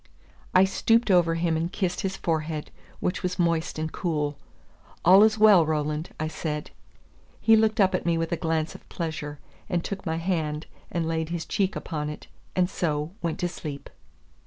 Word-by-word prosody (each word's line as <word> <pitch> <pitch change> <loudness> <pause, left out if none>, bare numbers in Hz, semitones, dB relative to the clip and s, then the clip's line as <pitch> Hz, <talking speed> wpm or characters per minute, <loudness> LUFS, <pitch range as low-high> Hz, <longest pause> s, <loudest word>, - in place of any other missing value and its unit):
I 185 - +8
stooped 225 +3 +2
over 170 -2 +4
him 165 -1 +1
and 165 +2 -1
kissed 185 -3 -1
his 190 0 -2
forehead, 155 -2 -2 0.3
which 180 - -1
was 180 0 -2
moist 170 -2 0
and 155 0 -2
cool. 150 -5 -1 0.7
"All 190 +3 +8
is 215 0 +5
well, 210 -5 +7
Roland," 155 +1 -1
I 155 - -1
said. 150 -1 -4 0.7
He 225 - +6
looked 220 0 +2
up 190 -2 +4
at 185 - 0
me 170 -1 +1
with 165 +1 -2
a - - +2
glance 160 -1 -1
of - - -14
pleasure, 150 -3 -4 0.3
and 175 -1 0
took 195 -1 -5
my 165 -3 -1
hand 160 -3 -1 0.2
and 170 -2 -1
laid 160 -1 -1
his 170 -1 -3
cheek 195 +3 0
upon 150 -3 -3
it, 150 - -8 0.3
and 180 -1 +3
so 155 -4 -2
went 165 -2 -2
to 175 - +2
sleep. 150 -5 -7
165 Hz, 185 wpm, -26 LUFS, 155-185 Hz, 0.7 s, I